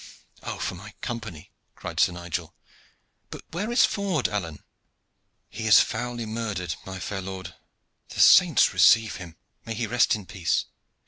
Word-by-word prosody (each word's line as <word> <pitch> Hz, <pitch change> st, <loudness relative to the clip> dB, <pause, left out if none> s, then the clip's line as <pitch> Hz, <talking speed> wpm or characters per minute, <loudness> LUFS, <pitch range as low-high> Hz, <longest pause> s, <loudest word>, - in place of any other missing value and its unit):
"Oh, -, -, -5 dB
for -, -, -3 dB
my 100 Hz, +4 st, -11 dB
Company!" 95 Hz, -, -6 dB, 0.2 s
cried -, -, -6 dB
Sir -, -, +4 dB
Nigel. 85 Hz, -1 st, -5 dB, 0.7 s
"But -, -, -9 dB
where 205 Hz, +7 st, -3 dB
is 240 Hz, -, +5 dB
Ford, 190 Hz, -, -1 dB
Alleyne?" 90 Hz, -5 st, -5 dB, 0.8 s
"He 110 Hz, 0 st, -5 dB
is 105 Hz, -, +8 dB
foully 120 Hz, -1 st, -2 dB
murdered, 110 Hz, -6 st, -3 dB
my 95 Hz, 0 st, -6 dB
fair 95 Hz, +2 st, -5 dB
lord." 95 Hz, -2 st, -7 dB, 0.6 s
"The -, -, -8 dB
saints -, -, +6 dB
receive 110 Hz, -2 st, +5 dB
him! 85 Hz, -4 st, -10 dB, 0.3 s
May 115 Hz, -, -5 dB
he 115 Hz, -, -2 dB
rest 120 Hz, +1 st, +2 dB
in 105 Hz, -3 st, -8 dB
peace! 90 Hz, -3 st, -1 dB
105 Hz, 150 wpm, -25 LUFS, 90-115 Hz, 0.8 s, is